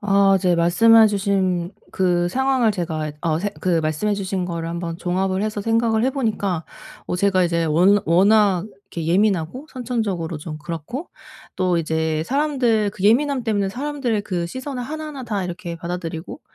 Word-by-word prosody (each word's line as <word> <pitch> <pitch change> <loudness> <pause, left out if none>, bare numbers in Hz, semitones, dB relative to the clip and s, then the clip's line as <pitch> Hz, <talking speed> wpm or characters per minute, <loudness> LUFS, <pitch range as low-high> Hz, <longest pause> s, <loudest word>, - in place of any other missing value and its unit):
아 200 -1 +4
이제 180 -1 +2
말씀해 220 +7 +6
주신 190 -3 0 0.2
그 175 -2 +1
상황을 260 0 +2
제가 160 -5 -3
어 160 -2 0
생 205 +4 -2
그 175 -3 +1
말씀해 155 +7 0
주신 190 -2 -2
거를 165 -1 -4
한번 170 -1 -4
종합을 185 +2 -1
해서 215 -1 -2
생각을 225 +1 +1
해 265 - +2
보니까 205 - -1 0.4
어 180 - -2
제가 190 -1 +2
이제 170 -1 0
워 180 +6 +4
워낙 195 +1 +4 0.3
이렇게 165 -2 -4
예민하고 195 - +1
선천적으로 220 - -3
좀 155 0 -7
그렇고 170 - -6 0.5
또 185 -2 +1
이제 160 -1 -1
사람들 255 - +1
그 200 -1 -7
예민함 260 +3 +3
때문에 205 -3 0
사람들 255 -3 -2
그 175 -4 -2
시선을 260 +5 -5
하나하나 300 0 -6
다 205 -5 -2
이렇게 175 -1 -6
받아들이고 170 - -6
195 Hz, 345 characters per minute, -21 LUFS, 170-225 Hz, 0.5 s, 말씀해